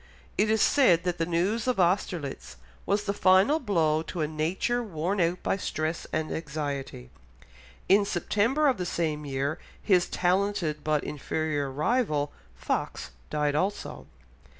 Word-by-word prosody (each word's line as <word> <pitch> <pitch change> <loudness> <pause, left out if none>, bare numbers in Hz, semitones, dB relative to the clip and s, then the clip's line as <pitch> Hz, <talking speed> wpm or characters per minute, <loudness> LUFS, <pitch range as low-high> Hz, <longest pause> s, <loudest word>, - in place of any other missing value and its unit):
It 215 - +2
is 220 -1 +3
said 185 - +4
that 175 -1 -2
the 165 - 0
news 195 +8 0
of 250 -5 +1
Austerlitz 165 - -1 0.3
was 205 +1 +1
the 200 - -1
final 195 +10 +4
blow 165 - +1
to 165 +1 -5
a 155 - +1
nature 170 +11 -1
worn 185 -2 -2
out 175 +2 0
by - - 0
stress 160 -3 -3
and 155 0 -2
anxiety. 140 - -4 0.8
In 200 +2 +5
September 210 - +1
of 265 - +2
the 180 - -3
same 155 -3 -2
year 140 +4 -2 0.2
his 185 -4 +2
talented 180 -4 0
but 155 -1 +1
inferior 150 -1 -2
rival, 150 - 0 0.2
Fox, - - -3 0.2
died 150 -1 0
also. 190 +7 -2
170 Hz, 145 wpm, -27 LUFS, 150-200 Hz, 0.8 s, In